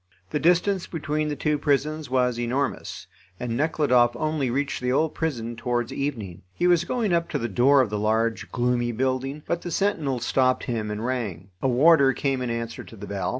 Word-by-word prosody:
The 150 - 0
distance 180 +3 +2
between 155 -2 -2
the 150 - -2
two 150 0 0
prisons 150 0 0
was 125 -2 +1
enormous, 125 +2 -2 0.3
and 120 -2 -3
Nekhludoff 125 -5 +2
only 155 -1 -1
reached 140 +3 -2
the 125 0 0
old 155 +4 +1
prison 120 -8 -3
towards 120 +1 -2
evening. 115 -12 -4
He - - 0
was 175 -1 +4
going 220 -3 0
up 170 0 +1
to - - -1
the 115 - -2
door 130 +6 +4
of 115 -5 -1
the 105 - -1
large, 110 +2 0
gloomy 120 -1 0
building, 130 +4 -2
but 170 0 -2
the 175 - -5
sentinel 160 -9 0
stopped 130 +2 +1
him 110 -4 -3
and 105 +2 -4
rang. 105 -8 -3
A - - +1
warder 140 +1 +5
came 135 -1 -1
in 125 - -2
answer 115 0 -4
to - - -13
the 100 - -8
bell. 100 -1 -3
130 Hz, 195 wpm, -25 LUFS, 120-150 Hz, 0.3 s, warder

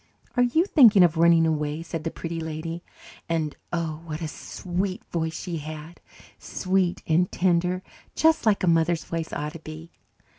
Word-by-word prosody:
"Are 245 - +3
you 280 +8 +3
thinking 230 - +7
of 170 -2 +3
running 165 0 +5
away?" 150 0 -1
said 165 -2 -5
the - - 0
Pretty 165 0 -5
Lady, 160 +1 -5 0.5
and, 160 -3 -1 0.2
oh, 165 -2 -2
what 155 -2 -5
a 165 - -3
sweet 185 +4 -4
voice 160 -1 -2
she 175 -3 -4
had 155 +2 -8 0.4
sweet 185 -2 -1
and 170 +3 +2
tender, 180 0 +1 0.3
just 320 +1 +3
like 205 -3 +3
a - - +2
mother's 165 0 +2
voice 165 -1 -4
ought 150 +1 -4
to 165 - -8
be! 155 +1 -10
165 Hz, 170 wpm, -25 LUFS, 160-180 Hz, 0.5 s, thinking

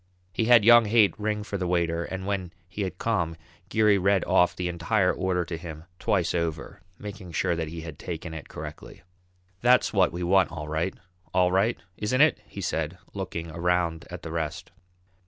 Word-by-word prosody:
He 110 - 0
had 120 -3 +6
young 120 0 +8
Haight 105 -1 +4
ring 105 0 -1
for 100 -2 -4
the 90 - -1
waiter, 85 -1 0
and 95 0 -5
when 95 -3 -3
he 100 +4 -6
had 95 -2 -3
come, 90 -8 -1 0.3
Geary 105 -2 +4
read 95 0 +2
off 90 -1 +3
the 90 - -2
entire 90 +3 +1
order 90 -2 -1
to 85 -1 -5
him 80 -2 -8 0.2
twice 90 -5 +1
over, 85 -4 -3 0.2
making 100 -4 -8
sure 85 - +1
that 80 -1 -2
he 80 +1 -7
had 80 -2 -9
taken 85 -1 -6
it 80 -2 -8
correctly. 75 0 -9 0.6
"That's 125 0 +4
what 95 -3 +4
we 90 +1 -4
want 95 -1 +3
all 75 -3 -6
right, 80 +4 -1 0.4
all 90 -1 +4
right 100 +6 +2 0.2
isn't 120 +5 0
it?" 155 +2 +4
he 100 - -8
said, 80 -1 -2 0.2
looking 85 -4 -5
around 85 -1 0
at 90 0 -8
the 80 - -6
rest. 85 +2 -4
90 Hz, 190 wpm, -26 LUFS, 85-100 Hz, 0.6 s, young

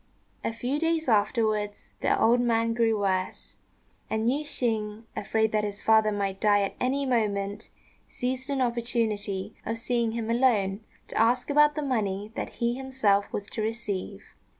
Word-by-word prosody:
A - - 0
few 250 +5 -2
days 325 -1 0
afterwards 215 -2 +1
the - - +2
old 240 +2 +4
man 230 -1 +2
grew 225 -2 +2
worse, 185 -2 -2 0.5
and 220 +1 0
Yüeh 275 +5 +2
shêng, 220 -7 -2
afraid 220 +1 0
that 215 -1 +1
his 205 -1 -5
father 220 -1 +4
might 195 -2 -2
die 205 -1 +4
at 195 - -2
any 275 +2 0
moment, 210 -4 -1 0.4
seized 260 +2 -3
an 275 -2 0
opportunity 230 -5 -1
of 225 +1 -3
seeing 235 -1 0
him 230 -1 -2
alone 220 -6 +2 0.3
to - - -2
ask 245 +5 +2
about 295 +1 +5
the 300 - -2
money 210 -6 -1
that - - -5
he 235 0 0
himself 250 -6 +1
was 200 - -3
to 225 - -3
receive. 215 -3 -3
225 Hz, 160 wpm, -27 LUFS, 205-245 Hz, 0.5 s, about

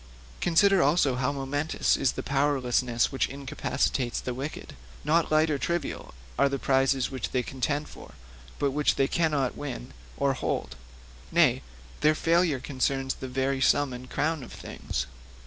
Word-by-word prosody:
Consider 190 +3 +4
also 145 -2 +3
how 125 +2 0
momentous 145 +2 0
is 135 - +1
the - - -5
powerlessness 130 -3 +1
which 135 - 0
incapacitates 130 -2 -1
the 125 - -4
wicked. 135 +5 -6 0.3
Not 165 +1 +2
light 155 +1 +4
or 145 - 0
trivial[L] 170 -1 -3 0.3
are 140 - +5
the 140 - -1
prizes 135 -1 +2
which 130 -4 -3
they 125 -1 0
contend 145 +4 -2
for, - - -13 0.4
but 140 - +1
which 145 +2 +2
they 135 - +2
cannot 150 -6 +1
win - - -6 0.2
or 140 -1 +2
hold; - - -3 0.6
nay, - - +4 0.4
their 155 +1 +4
failure 165 -3 +2
concerns 135 0 -1
the 130 - -7
very 135 +1 -1
sum 145 -1 +3
and 125 +1 -8
crown 160 0 0
of 125 - -10
things. 65 - -4
135 Hz, 155 wpm, -27 LUFS, 130-150 Hz, 0.6 s, are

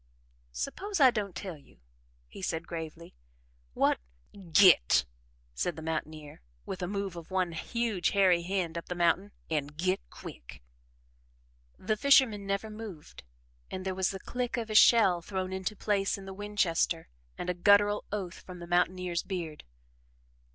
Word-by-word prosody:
"Suppose 380 - -3
I 265 -3 +8
don't 205 -5 -3
tell 180 -6 -6
you," - - -22 0.5
he - - -11
said 165 -3 -2
gravely. 165 0 -7 0.6
"What - - +2 0.3
" 190 -4 -15
"Git!" 160 - +6 0.5
said 175 - -2
the 160 - -8
mountaineer, 155 - -5 0.2
with 185 - -5
a 180 - -1
move 200 -1 -3
of 170 -1 -9
one 185 -2 0
huge 210 +2 -1
hairy 185 -3 +4
hand 175 -2 -2
up - - -13
the 180 - -4
mountain. 180 +4 +2 0.2
"An' 150 -3 0
git 180 +6 -1
quick!" - - -11 1.1
The 215 +3 -1
fisherman 225 -6 +4
never 200 +2 -2
moved 210 -8 -9 0.5
and 185 0 -6
there 190 - -1
was 190 0 +1
the 195 - -5
click 245 +4 -3
of 225 -2 -3
a - - -2
shell 210 -5 +6
thrown 190 +1 -4
into 190 +3 -3
place 200 -2 0
in 195 - -10
the 195 - -7
Winchester 190 -5 0 0.3
and - - -5
a 180 - +1
guttural 205 +3 +4
oath 190 -4 -4
from 180 -1 -11
the 175 - -8
mountaineer's 175 0 +1
beard. 170 -6 -5
185 Hz, 160 wpm, -30 LUFS, 170-205 Hz, 1.1 s, I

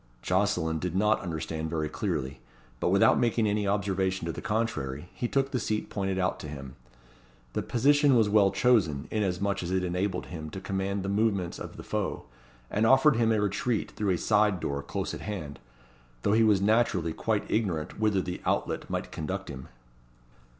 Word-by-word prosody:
Jocelyn 90 -4 +1
did 90 +1 -3
not 105 +3 +3
understand 80 -3 -4
very 80 -1 -1
clearly; 65 -3 -3 0.4
but - - +1
without - - +5
making 115 -1 +2
any 105 -1 0
observation 95 -2 0
to 85 - -1
the - - -7
contrary, 90 - -2
he 120 - -2
took 135 +2 0
the 125 - 0
seat 110 -1 -2
pointed 95 -2 -1
out 95 0 0
to - - -7
him. 70 -3 -8 0.8
The - - -1
position 145 +3 +3
was 110 -3 +4
well 105 -1 +5
chosen, 95 - +2
inasmuch 100 -1 0
as 85 - -4
it 95 0 0
enabled 90 +1 -1
him 80 -3 -7
to 95 - -6
command 95 +1 -2
the 95 - -3
movements 100 -4 0
of - - -8
the - - -8
foe, - - -2 0.5
and 110 +2 +2
offered 135 +1 +5
him 115 -1 +3
a 110 - +2
retreat 105 +3 -1
through 105 -2 -2
a 90 - +2
side 105 -1 +2
door, 70 -3 -2
close 70 - -4
at - - -6
hand; 85 -9 -5 0.6
though 100 - +2
he 110 - +4
was 105 -3 +4
naturally 100 -6 +2
quite 110 +2 0
ignorant 90 -9 -1
whither 105 -4 +2
the 90 0 -5
outlet - - -1
might - - -3
conduct 95 +4 -4
him. 65 -2 -8
100 Hz, 185 wpm, -28 LUFS, 85-110 Hz, 0.8 s, without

